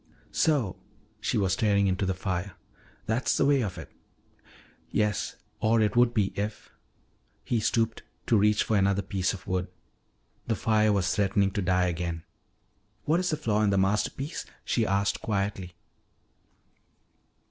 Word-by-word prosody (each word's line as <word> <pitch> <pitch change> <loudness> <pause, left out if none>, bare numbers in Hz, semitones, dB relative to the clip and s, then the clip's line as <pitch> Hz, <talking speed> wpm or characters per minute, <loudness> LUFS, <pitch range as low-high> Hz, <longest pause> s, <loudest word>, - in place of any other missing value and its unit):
"So," 140 - +1 0.4
she - - -1
was 95 -2 +1
staring 100 0 +2
into 95 +1 0
the 95 - 0
fire, 95 -1 -3 0.5
"that's 110 +4 0
the - - +3
way 140 -1 +4
of 95 -5 -3
it?" 80 - -9 1.0
"Yes. 105 -1 0 0.2
Or 115 +1 +3
it 105 -1 +1
would 120 0 +5
be 105 -4 0
if 105 +1 -4 0.4
" - - -41 0.3
He 120 - 0
stooped 115 +1 0 0.2
to 115 - +3
reach 105 0 +4
for 110 - 0
another 100 0 +2
piece 95 0 -1
of 90 -2 -8
wood. 90 -1 -1 0.8
The 115 - +1
fire 110 -1 +2
was 95 -2 +1
threatening 100 -1 +2
to 105 - -2
die 90 0 +2
again. 85 -1 -3 0.8
"What 160 +3 +3
is 185 - 0
the 155 - 0
flaw 110 -8 0
in 105 - +3
the 100 - +2
masterpiece?" 105 - 0 0.2
she 115 -3 +1
asked 100 0 0
quietly. 100 -4 -2
100 Hz, 155 wpm, -27 LUFS, 95-110 Hz, 1.0 s, would